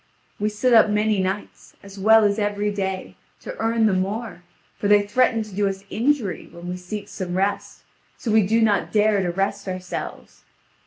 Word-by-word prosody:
We 210 Hz, +1 st, +1 dB
sit 230 Hz, +4 st, +1 dB
up 220 Hz, -2 st, +6 dB
many 210 Hz, -1 st, +1 dB
nights, 190 Hz, +2 st, -5 dB
as 200 Hz, 0 st, -11 dB
well 220 Hz, +2 st, +6 dB
as 205 Hz, +1 st, +2 dB
every 205 Hz, 0 st, -1 dB
day, 190 Hz, -2 st, -4 dB, 0.2 s
to -, -, -7 dB
earn 225 Hz, 0 st, +1 dB
the 210 Hz, -, +3 dB
more, 195 Hz, +1 st, -3 dB, 0.3 s
for 205 Hz, -, -2 dB
they 205 Hz, 0 st, +5 dB
threaten 225 Hz, +1 st, +2 dB
to 215 Hz, -2 st, -12 dB
do 200 Hz, +1 st, +1 dB
us 195 Hz, 0 st, -4 dB
injury, 230 Hz, -, 0 dB
when 170 Hz, +1 st, -10 dB
we 180 Hz, -, -3 dB
seek 200 Hz, +3 st, -7 dB
some 185 Hz, -3 st, -5 dB
rest, 200 Hz, +2 st, -2 dB, 0.3 s
so 230 Hz, -, -3 dB
we 220 Hz, 0 st, +5 dB
do 225 Hz, +4 st, +2 dB
not 210 Hz, -3 st, +2 dB
dare 210 Hz, -1 st, +3 dB
to 180 Hz, -, -1 dB
rest 195 Hz, +3 st, -2 dB
ourselves. 185 Hz, -1 st, -6 dB
205 Hz, 190 wpm, -23 LUFS, 190-220 Hz, 0.3 s, up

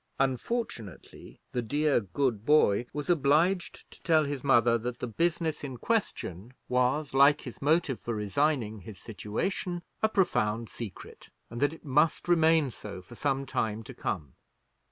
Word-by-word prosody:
Unfortunately 130 Hz, -, -3 dB
the 125 Hz, -, -1 dB
dear 145 Hz, +5 st, +2 dB
good 115 Hz, +1 st, -1 dB
boy 120 Hz, -6 st, +4 dB
was 150 Hz, -1 st, -5 dB
obliged 170 Hz, +3 st, +2 dB
to -, -, -12 dB
tell 160 Hz, -3 st, +4 dB
his 140 Hz, -3 st, -4 dB
mother 120 Hz, -4 st, +4 dB
that 120 Hz, +1 st, -3 dB
the -, -, -4 dB
business 165 Hz, -, -1 dB
in 130 Hz, -3 st, -5 dB
question 120 Hz, -, -2 dB
was, 125 Hz, +4 st, +1 dB
like 140 Hz, +2 st, +5 dB
his 125 Hz, -, -9 dB
motive 150 Hz, -3 st, +2 dB
for 120 Hz, -, -4 dB
resigning 110 Hz, +1 st, 0 dB
his 100 Hz, +1 st, -10 dB
situation, 170 Hz, -, -3 dB, 0.2 s
a 220 Hz, -, +3 dB
profound 115 Hz, -, +1 dB
secret, 110 Hz, -6 st, -9 dB, 0.2 s
and 120 Hz, -, -5 dB
that 145 Hz, 0 st, +3 dB
it -, -, -18 dB
must 150 Hz, +5 st, +2 dB
remain 160 Hz, -4 st, +4 dB
so 105 Hz, -3 st, -8 dB
for 90 Hz, -, -14 dB
some 135 Hz, +2 st, -1 dB
time 110 Hz, -4 st, -2 dB
to -, -, -10 dB
come. 70 Hz, -4 st, -4 dB
135 Hz, 155 wpm, -29 LUFS, 115-155 Hz, 0.2 s, like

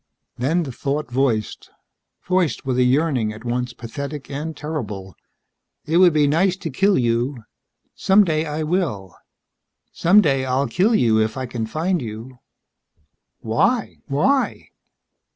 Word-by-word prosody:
Then 160 Hz, +8 st, 0 dB
the 135 Hz, -, -6 dB
thought 140 Hz, +2 st, -3 dB
voiced 120 Hz, -4 st, -1 dB, 0.6 s
voiced 180 Hz, -5 st, 0 dB
with 130 Hz, -1 st, 0 dB
a -, -, +5 dB
yearning 130 Hz, -4 st, +1 dB
at 110 Hz, +3 st, -11 dB
once 125 Hz, +1 st, -2 dB
pathetic 140 Hz, +6 st, -7 dB
and 150 Hz, +2 st, -5 dB
terrible: 110 Hz, -, -5 dB, 0.7 s
"It 160 Hz, +2 st, +1 dB
would 180 Hz, -1 st, +7 dB
be 150 Hz, -1 st, +3 dB
nice 175 Hz, +6 st, +2 dB
to 165 Hz, -5 st, -5 dB
kill 195 Hz, +8 st, +2 dB
you. 120 Hz, +1 st, 0 dB, 0.5 s
Someday 180 Hz, -6 st, +3 dB
I 150 Hz, +1 st, -3 dB
will. 150 Hz, -, -2 dB, 0.8 s
Someday 165 Hz, -8 st, +3 dB
I'll 130 Hz, +2 st, 0 dB
kill 190 Hz, -, +2 dB
you 115 Hz, -, +3 dB
if 110 Hz, +3 st, -1 dB
I 130 Hz, -, -3 dB
can 120 Hz, -2 st, -4 dB
find 165 Hz, +6 st, -1 dB
you." 115 Hz, +2 st, -8 dB, 1.0 s
"Why? 195 Hz, -, 0 dB
Why?" 260 Hz, -, 0 dB
140 Hz, 135 wpm, -21 LUFS, 120-165 Hz, 1.0 s, would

